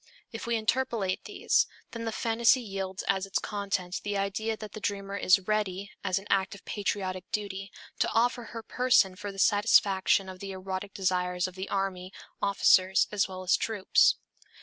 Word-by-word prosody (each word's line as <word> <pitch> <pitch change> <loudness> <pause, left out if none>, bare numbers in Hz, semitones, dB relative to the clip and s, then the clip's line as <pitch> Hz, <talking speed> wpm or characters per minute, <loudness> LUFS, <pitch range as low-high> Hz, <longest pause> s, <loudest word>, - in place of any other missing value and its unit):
If 225 - -6
we 235 - +1
interpolate 220 -4 -1
these, - - +2 0.2
then 230 -1 -5
the 225 - -1
phantasy 230 +3 +3
yields 195 -4 -5
as 195 0 0
its 195 - 0
content 195 -3 -3
the 205 -1 -2
idea 215 +3 -1
that 215 -2 -8
the 215 - -8
dreamer 200 -1 -3
is 195 0 +5
ready, 200 -2 -1
as 185 -2 +1
an 195 - -5
act 195 0 +1
of 200 - -16
patriotic 190 -3 -3
duty, 195 -2 -4 0.3
to - - +2
offer 240 +1 +1
her 230 0 -8
person 245 -8 +3
for 205 +2 -6
the 195 - -13
satisfaction 200 -1 +4
of 185 -1 -9
the 195 0 -6
erotic 190 +1 -5
desires 180 -1 0
of 185 - -9
the 190 +1 -6
army, 190 -2 -2 0.3
officers 190 -1 +4
as 205 -1 +1
well 185 -1 -7
as 180 - +4
troops. 210 -4 +3
195 Hz, 175 wpm, -29 LUFS, 190-215 Hz, 0.3 s, is